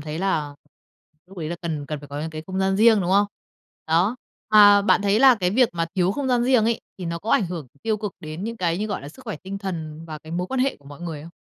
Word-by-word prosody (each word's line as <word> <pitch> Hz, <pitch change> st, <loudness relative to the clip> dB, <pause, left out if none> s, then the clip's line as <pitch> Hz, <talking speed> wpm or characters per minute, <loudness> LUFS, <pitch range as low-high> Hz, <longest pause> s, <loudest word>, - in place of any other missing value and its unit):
thấy 155 Hz, +1 st, -5 dB
là 155 Hz, -6 st, -1 dB, 0.7 s
lúc 190 Hz, +1 st, -13 dB
ấy 155 Hz, -2 st, -4 dB
là 170 Hz, -, -4 dB
cần 155 Hz, -4 st, -3 dB
cần 150 Hz, -1 st, -5 dB
phải 145 Hz, -, -12 dB
có 145 Hz, +1 st, -5 dB
những 160 Hz, +1 st, -4 dB
cái 155 Hz, 0 st, -7 dB
không 190 Hz, 0 st, -4 dB
gian 190 Hz, 0 st, +1 dB
riêng, 220 Hz, 0 st, +5 dB
đúng 180 Hz, -1 st, -1 dB
không? 200 Hz, +2 st, +4 dB, 0.6 s
Đó, 175 Hz, +9 st, +2 dB, 0.3 s
mà 205 Hz, -1 st, +8 dB
bạn 200 Hz, -, +3 dB
thấy 200 Hz, +1 st, +3 dB
là 265 Hz, -1 st, +8 dB
cái 180 Hz, -5 st, 0 dB
việc 245 Hz, +4 st, +4 dB
mà 165 Hz, -1 st, -1 dB
thiếu 185 Hz, 0 st, +2 dB
không 270 Hz, +4 st, -2 dB
gian 245 Hz, -1 st, +2 dB
riêng 250 Hz, -3 st, +4 dB
ấy, 230 Hz, 0 st, +1 dB, 0.2 s
thì 185 Hz, -, -6 dB
nó 170 Hz, 0 st, -3 dB
có 210 Hz, +6 st, -5 dB
ảnh 195 Hz, -, +3 dB
hưởng 170 Hz, -5 st, -6 dB, 0.2 s
tiêu 220 Hz, -1 st, 0 dB
cực 210 Hz, -2 st, -5 dB
đến 155 Hz, +5 st, -6 dB
những 230 Hz, +1 st, -4 dB
cái 175 Hz, -3 st, 0 dB
như, 215 Hz, -, -1 dB
gọi 200 Hz, -8 st, -4 dB
là, 140 Hz, -, -8 dB
sức 155 Hz, -, -15 dB
khỏe -, -, -4 dB
tinh 195 Hz, +1 st, -5 dB
thần 165 Hz, -5 st, -6 dB
và 155 Hz, -2 st, -7 dB
cái 160 Hz, +1 st, -11 dB
mối 180 Hz, +1 st, -2 dB
quan 260 Hz, +4 st, -2 dB
hệ 270 Hz, +1 st, +1 dB
của 145 Hz, -, -27 dB
mọi 145 Hz, +2 st, -11 dB
người 165 Hz, -4 st, -6 dB
không? 165 Hz, -, -11 dB
185 Hz, 290 wpm, -23 LUFS, 160-210 Hz, 0.7 s, mà